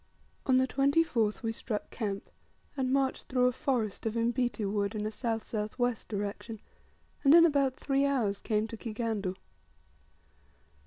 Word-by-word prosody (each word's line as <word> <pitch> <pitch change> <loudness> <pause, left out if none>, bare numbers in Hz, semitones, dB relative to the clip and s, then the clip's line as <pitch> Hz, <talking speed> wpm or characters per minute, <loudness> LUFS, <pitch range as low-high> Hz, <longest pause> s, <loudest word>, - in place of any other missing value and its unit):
On 260 -1 +5
the 260 0 +3
24th 275 -5 +2
we 225 - 0
struck 220 -1 -4
camp, 200 -4 -4 0.4
and 260 -2 0
marched 270 -1 0
through 250 -1 +2
a 250 - +4
forest 230 -5 -1
of 220 - -2
imbiti 235 -1 0
wood 200 +1 -1
in 210 0 -2
a - - 0
S.S.W. 225 +1 -2
direction, 205 +2 -4 0.6
and 285 +2 +7
in 335 0 +9
about 280 -5 +2
three 275 0 +1
hours 225 -8 0
came 215 -1 0
to 225 - -6
Kigandu. 215 -4 -3
230 Hz, 145 wpm, -30 LUFS, 215-265 Hz, 0.6 s, in